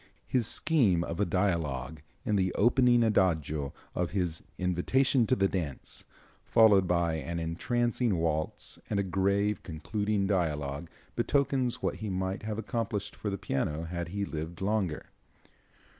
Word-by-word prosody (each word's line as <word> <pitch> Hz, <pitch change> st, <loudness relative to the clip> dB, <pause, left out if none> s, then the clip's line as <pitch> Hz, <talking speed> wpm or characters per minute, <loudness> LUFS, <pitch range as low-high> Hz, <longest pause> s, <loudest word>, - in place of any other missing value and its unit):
His 125 Hz, -4 st, +1 dB
scheme 115 Hz, -, +3 dB
of 85 Hz, 0 st, -5 dB
a 100 Hz, -, +3 dB
dialogue, 80 Hz, -7 st, -1 dB, 0.2 s
in 105 Hz, -4 st, +1 dB
the 95 Hz, -2 st, +2 dB
opening 120 Hz, +1 st, +4 dB
adagio 80 Hz, -9 st, +1 dB, 0.2 s
of 90 Hz, -1 st, -1 dB
his 90 Hz, -5 st, -1 dB, 0.2 s
"Invitation 115 Hz, +8 st, +2 dB
to 130 Hz, -, +3 dB
the 95 Hz, -5 st, +3 dB
Dance," 80 Hz, -9 st, -4 dB, 0.4 s
followed 105 Hz, -4 st, +5 dB
by 85 Hz, -2 st, +1 dB
an 85 Hz, +2 st, -4 dB
entrancing 115 Hz, +7 st, 0 dB
waltz 80 Hz, -1 st, -2 dB
and 100 Hz, -, 0 dB
a -, -, +2 dB
grave 100 Hz, +2 st, +1 dB
concluding 100 Hz, +5 st, -1 dB
dialogue, 80 Hz, -5 st, -1 dB, 0.3 s
betokens 130 Hz, -3 st, +1 dB
what -, -, 0 dB
he 110 Hz, -, -4 dB
might 95 Hz, 0 st, -2 dB
have 110 Hz, -1 st, -4 dB
accomplished 110 Hz, -2 st, -3 dB
for 105 Hz, -, -3 dB
the 100 Hz, -, -2 dB
piano 75 Hz, 0 st, -2 dB
had 85 Hz, 0 st, -4 dB
he 100 Hz, +3 st, -2 dB
lived 80 Hz, 0 st, -5 dB
longer. 95 Hz, -5 st, -1 dB
95 Hz, 145 wpm, -30 LUFS, 85-110 Hz, 0.4 s, followed